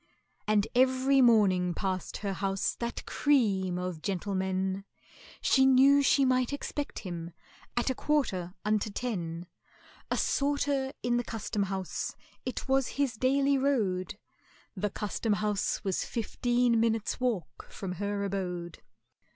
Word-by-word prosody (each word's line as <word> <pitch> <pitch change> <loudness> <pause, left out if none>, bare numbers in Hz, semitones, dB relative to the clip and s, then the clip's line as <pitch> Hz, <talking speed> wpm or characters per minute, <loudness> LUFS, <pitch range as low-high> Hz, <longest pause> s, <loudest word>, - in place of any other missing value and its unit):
And 210 -1 +3
every 260 +2 +4
morning 190 -7 +4
passed 185 -2 -3
her 200 -2 -3
house 195 0 -1
that 235 0 -4
cream 200 -11 +2
of 180 -3 -4
gentlemen, 190 0 -1 0.6
She 265 - +4
knew 270 +2 +6
she 275 0 +4
might 255 -1 +2
expect 285 0 -4
him 170 -3 -6 0.4
at 240 +2 +2
a - - 0
quarter 200 -12 -1
unto 215 0 +1
ten; 175 -7 -4 0.6
A - - 0
sorter 280 -1 +1
in 240 0 +2
the 240 - 0
Custom 215 -2 -3
house, 190 -2 -3 0.3
it 255 - -4
was 270 -1 +2
his 280 -4 +1
daily 275 +3 +2
road 205 -9 0 0.6
(The 210 +2 -1
Custom 210 +2 -1
house 210 -1 -1
was 190 -2 0
fifteen 240 +1 +1
minutes' 225 -1 0
walk 240 -9 -2
from 190 -2 -6
her 200 +2 -2
abode). 180 -3 -4
215 Hz, 130 wpm, -30 LUFS, 190-255 Hz, 0.6 s, knew